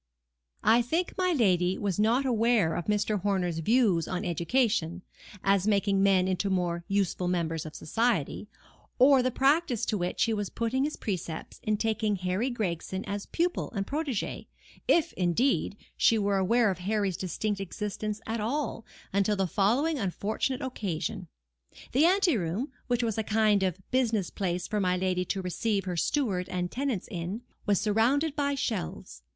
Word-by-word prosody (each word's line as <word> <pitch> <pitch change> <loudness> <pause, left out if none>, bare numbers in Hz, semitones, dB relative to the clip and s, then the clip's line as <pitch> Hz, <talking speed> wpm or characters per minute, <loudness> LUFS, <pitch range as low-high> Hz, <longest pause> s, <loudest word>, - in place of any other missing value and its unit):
I 235 +2 +5
think 330 +10 -1
my 365 -1 +1
lady 185 - +2
was 200 -2 -2
not 235 +6 +3
aware 230 -8 +2
of 175 - -4
Mr. 210 -1 0
Horner's 180 -4 0
views 200 -3 +2
on 185 -1 -3
education 180 - 0 0.4
(as 195 0 +2
making 200 -1 +2
men 190 -2 +4
into 190 +1 0
more 175 -2 -1
useful 195 -2 0
members 165 -2 -1
of 155 - -10
society), 215 - -1 0.5
or 265 +1 +6
the 255 - +1
practice 270 -2 +2
to 210 - -1
which 175 0 0
he 225 - +1
was 205 -2 -2
putting 250 +4 0
his 305 - -3
precepts 170 -5 -5
in 215 -1 0
taking 220 -1 0
Harry 185 +6 -1
Gregson 190 -4 -3
as 200 0 -4
pupil 350 +1 -1
and 195 -1 -1
protege; 285 -5 -3 0.4
if, 335 0 +3
indeed, 200 +4 +1 0.2
she 225 - +4
were 200 -1 +1
aware 225 +3 +3
of 185 - -5
Harry's 200 0 0
distinct 195 +3 -2
existence 210 +2 -4
at 225 +1 -2
all, 250 +1 -2 0.3
until 200 +1 +2
the 195 -1 +1
following 245 - +1
unfortunate 220 +6 -2
occasion. 195 -6 -3 0.6
The 280 +6 +4
anteroom, 265 - +1 0.2
which 245 -1 +1
was 225 -2 -1
a - - 0
kind 215 -2 +3
of 185 -1 0
business 230 -7 +1
place 180 -2 -2
for 210 - -1
my 180 -2 +1
lady 180 0 0
to 190 +1 -2
receive 200 +2 -1
her 180 -2 -3
steward 190 - 0
and 180 -1 -2
tenants 260 -7 -2
in, 185 +5 -4 0.2
was 205 -2 +3
surrounded 245 +9 +2
by 285 -1 0
shelves. 210 - -4
205 Hz, 160 wpm, -28 LUFS, 185-240 Hz, 0.6 s, or